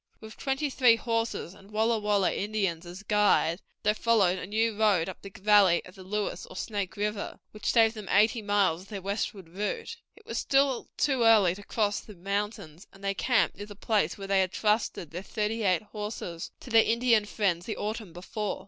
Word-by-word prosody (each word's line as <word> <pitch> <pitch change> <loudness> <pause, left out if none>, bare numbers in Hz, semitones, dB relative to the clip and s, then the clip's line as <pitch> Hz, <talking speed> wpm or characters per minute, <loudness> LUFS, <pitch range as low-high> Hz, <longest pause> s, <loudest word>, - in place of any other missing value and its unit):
With 220 0 -11
twenty 270 +1 -2
three 250 -3 +5
horses, 230 -5 -2
and 195 0 -17
Walla 220 +1 +1
Walla 205 -2 +1
Indians 195 -5 -2
as 180 +4 -9
guides, 205 -5 +2 0.2
they 210 - +3
followed 210 -5 +2
a 180 - -6
new 220 +2 0
road 205 -6 +3
up 190 - -7
the 195 - -9
valley 195 -3 +4
of 180 - -13
the 190 - -13
Lewis 205 +2 -3
or - - -12
Snake 200 -1 -4
River, 210 0 -3
which 215 - -2
saved 225 -2 +4
them 215 -4 -8
eighty 220 +3 +3
miles 200 -5 +1
of 190 - -15
their 205 -2 -6
westward 200 -2 -3
route. 210 - -4 0.2
It 425 - -19
was - - -3
still 275 -2 +1
too 270 -4 +1
early 215 -6 +6
to 200 - -10
cross 205 0 -1
the 210 - -12
mountains, 200 -2 -4
and 195 - -17
they 195 0 0
camped 245 +4 +1
near 205 - -7
the 205 - -10
place 200 -5 0
where 195 - -7
they 195 -1 +3
had 185 -1 0
trusted 210 -7 0
their 175 +3 -5
thirty 215 +2 -2
eight 185 -2 +2
horses 210 -5 -6
to 250 - -11
their 225 0 +7
Indian 230 -2 +3
friends 190 -5 -1
the 220 - -3
autumn 215 -2 -4
before. 190 +4 -4
210 Hz, 200 wpm, -28 LUFS, 190-225 Hz, 0.2 s, their